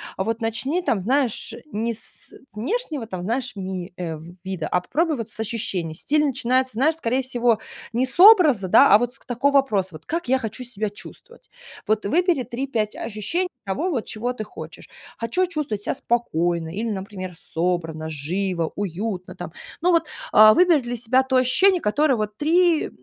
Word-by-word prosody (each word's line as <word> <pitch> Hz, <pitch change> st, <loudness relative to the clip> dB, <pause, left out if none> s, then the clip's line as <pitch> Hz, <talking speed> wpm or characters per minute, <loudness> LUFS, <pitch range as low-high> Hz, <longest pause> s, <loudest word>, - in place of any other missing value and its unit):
Вот 225 Hz, +4 st, -2 dB
начни 260 Hz, +10 st, -1 dB
там, 220 Hz, -, 0 dB
знаешь, 245 Hz, 0 st, 0 dB, 0.2 s
не 230 Hz, +2 st, -2 dB
с -, -, -7 dB, 0.2 s
внешнего 295 Hz, -, -3 dB
там, 185 Hz, -4 st, -6 dB
знаешь, 245 Hz, +3 st, -2 dB
ми 185 Hz, -2 st, -5 dB
э, 165 Hz, -3 st, -4 dB
в 170 Hz, +3 st, -12 dB
вида, 190 Hz, -4 st, -4 dB
а 180 Hz, -, +1 dB
попробуй 315 Hz, -, 0 dB
вот 230 Hz, -1 st, -6 dB
с -, -, -9 dB
ощущений. 200 Hz, -7 st, -2 dB
Стиль 300 Hz, -, +1 dB
начинается, 260 Hz, -2 st, +1 dB
знаешь, 290 Hz, +8 st, +2 dB
скорее 255 Hz, -1 st, 0 dB
всего, 240 Hz, -3 st, +1 dB, 0.3 s
не 250 Hz, +3 st, +2 dB
с 260 Hz, -, -2 dB
образа, 345 Hz, -, +7 dB
да, 185 Hz, -, +6 dB
а 210 Hz, -, +8 dB
вот 245 Hz, +1 st, -2 dB
с -, -, -6 dB
к -, -, -25 dB
такого 275 Hz, +3 st, 0 dB
вопроса 215 Hz, -9 st, +2 dB
вот: 155 Hz, -, -12 dB
"Как 335 Hz, -1 st, -3 dB
я 265 Hz, +1 st, +3 dB
хочу 230 Hz, +1 st, -5 dB
себя 215 Hz, -4 st, -3 dB
чувствовать?". 480 Hz, -, -13 dB, 0.4 s
Вот 215 Hz, -1 st, +1 dB
выбери 335 Hz, -, +2 dB
3-5 235 Hz, -3 st, -3 dB
ощущений 330 Hz, -, -2 dB, 0.2 s
того, 200 Hz, -, -1 dB
вот 255 Hz, -10 st, -2 dB
чего 240 Hz, +3 st, -3 dB
ты 220 Hz, -3 st, -5 dB
хочешь. 210 Hz, -, -10 dB, 0.3 s
Хочу 235 Hz, +12 st, 0 dB
чувствовать 295 Hz, -, -3 dB
себя -, -, -1 dB
спокойно 175 Hz, -9 st, -1 dB
или, 225 Hz, +3 st, -2 dB
например, 190 Hz, -2 st, -5 dB
собранно, 165 Hz, -2 st, -2 dB
живо, 170 Hz, +3 st, -2 dB
уютно 195 Hz, 0 st, -4 dB
там. -, -, -8 dB, 0.3 s
Ну, 355 Hz, +1 st, +3 dB
вот, 330 Hz, -2 st, +3 dB, 0.3 s
а 215 Hz, 0 st, +9 dB
выбери 345 Hz, -3 st, +4 dB
для 240 Hz, 0 st, -4 dB
себя 250 Hz, +3 st, +2 dB
то 260 Hz, 0 st, +1 dB
ощущение, 360 Hz, +9 st, +4 dB
которое 275 Hz, +6 st, +2 dB
вот 210 Hz, -1 st, -3 dB
3, 335 Hz, +1 st, +3 dB
230 Hz, 180 wpm, -23 LUFS, 195-275 Hz, 0.4 s, а